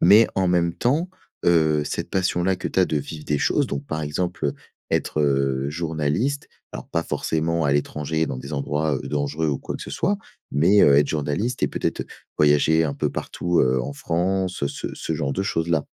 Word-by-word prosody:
mais 105 +5 +7
en 95 -1 +2
même 85 -1 +2
temps, 150 - 0 0.3
heu, 80 -3 +4
cette - - -3
passion-là 90 0 +1
que 90 - -3
tu 95 - +1
as - - +6
de 80 - -1
vivre 75 +1 -5
des 75 - +1
choses, - - +2
donc, 70 0 -4
par 80 - -3
exemple, 85 +3 -2
heu, 70 - -1 0.4
être, 75 - 0
heu, 70 -1 +1
journaliste, 80 - -1 0.2
alors - - -8
pas - - 0
forcément 80 +1 -1
à 70 - +2
l'étranger 75 +2 0
dans 65 - -4
des 70 +3 -8
endroits, 75 +2 0
heu, 65 - -6
dangereux 75 +2 -1
ou 70 - 0
quoi - - -5
que - - -8
ce - - -8
soit, 200 +4 0 0.3
mais, 90 +8 +4
heu, 70 - +6
être 70 0 +4
journaliste 80 - -1
et - - +3
peut-être, - - -2
heu, - - -17 0.3
voyager 75 +2 +4
un 70 -3 -2
peu - - -1
partout, 85 -1 -1
heu, 65 0 +2
en 70 +3 -4
France, 90 +2 -1
ce 70 - -4
ce 80 - -4
genre 70 -2 -1
de 95 - 0
choses 80 -3 -1
là? 80 -3 +1
80 Hz, 210 wpm, -23 LUFS, 70-90 Hz, 0.4 s, mais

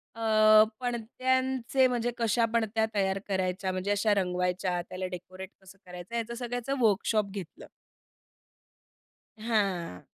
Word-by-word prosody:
अ, 215 -1 +6 0.2
पणत्यांचे, 255 +2 0
म्हणजे 240 -1 -1
कशा 230 0 +2
पणत्या 220 -1 +1
तयार 195 -1 +1
करायच्या? 190 -1 -1
म्हणजे 185 +2 -2
अशा 205 +1 +2
रंगवायच्या, 180 -1 -1
त्याला 185 0 -4
डेकोरेट 185 +1 -8
कसं 190 +1 -16
करायचं? 180 +4 -9
याचं 235 0 -3
सगळ्याचं 245 +2 -3
वर्कशॉप 215 -1 +2
घेतलं. 190 -5 -8 1.7
हां. 195 - -1
215 Hz, 110 wpm, -29 LUFS, 185-235 Hz, 1.7 s, अ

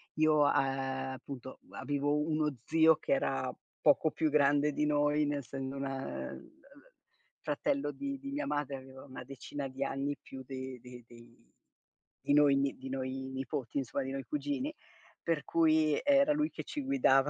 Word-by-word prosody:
io, 155 0 +4
uhm, - - +5
appunto 135 -1 -2
avevo 145 +1 0
uno 150 -1 0
zio 160 0 +6
che - - -4
era 275 - 0 0.3
poco 160 - +5
più 160 +1 +1
grande 145 0 +4
di 150 - +1
noi, 150 0 +3
nel 145 0 0
essendo 135 0 -5
un, 135 - -2
ehm, 135 - -5 0.9
fratello 280 - 0
di 275 - -4
di 275 0 -6
mia 295 +1 -2
madre, 145 -2 -1
aveva 130 0 -12
una 130 -2 -9
decina 135 +1 -5
di 135 +1 -3
anni 140 +1 -2
più 135 - -9
de 130 -1 -6
de 125 -1 -11
dei 120 0 -17 0.7
di - - +1
noi 145 -1 +6
ni 140 0 +1
di 130 0 -7
noi 130 0 -2 0.2
nipoti, 135 +1 -3
insomma, 135 +1 -1
di 135 - -4
noi 135 0 -3
cugini. 290 -1 -2 0.5
Per 165 -3 0
cui 155 -2 +3
era 280 +1 +5
lui 300 +1 +1
che - - -7
ci 295 - -4
guidava, 145 - +4
140 Hz, 165 wpm, -32 LUFS, 135-155 Hz, 0.9 s, zio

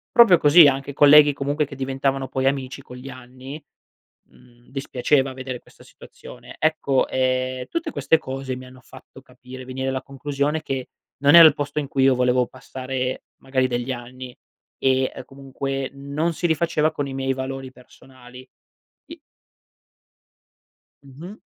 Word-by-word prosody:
Proprio 230 -7 +7
così, 150 +2 +7
anche 135 0 -1
colleghi 145 +1 +7
comunque 145 +2 -1
che 140 - -11
diventavano 135 0 -2
poi 130 0 -3
amici 135 -2 -2
con 125 - -13
gli 130 +2 -10
anni 130 +3 -11 0.7
mhmm, 120 -1 -23
dispiaceva 135 0 0
vedere 130 -1 -6
questa - - -20
situazione. - - -14
Ecco, 155 -4 +1
ehm, 130 0 -1
tutte 335 -1 -3
queste 160 - +2
cose 135 -3 -6
mi 130 0 -10
hanno 130 0 -15
fatto 130 +1 -16
capire 130 0 -12
venire 130 +1 -5
alla 130 0 -3
conclusione 140 +3 -3
che 135 -4 -5 0.3
non 145 +3 +4
era 170 -1 +11
il 155 - +3
posto 145 +1 -3
in 145 - -4
cui 135 0 0
io 135 -1 +4
volevo 125 0 +2
passare 130 0 -5
magari 130 -1 -1
degli 120 +1 -3
anni, 125 +1 -10 0.4
e, 130 0 +1
ehm, - - -8
comunque 135 0 -5
non 140 +4 -3
si 175 - -1
rifaceva 160 -1 +1
con 145 -2 -4
i 135 - -7
miei 135 0 -1
valori 130 0 -6
personali. 130 0 -16 0.6
I - - -11 1.9
Mh-mh. 160 +10 -11
135 Hz, 155 wpm, -22 LUFS, 130-145 Hz, 1.9 s, era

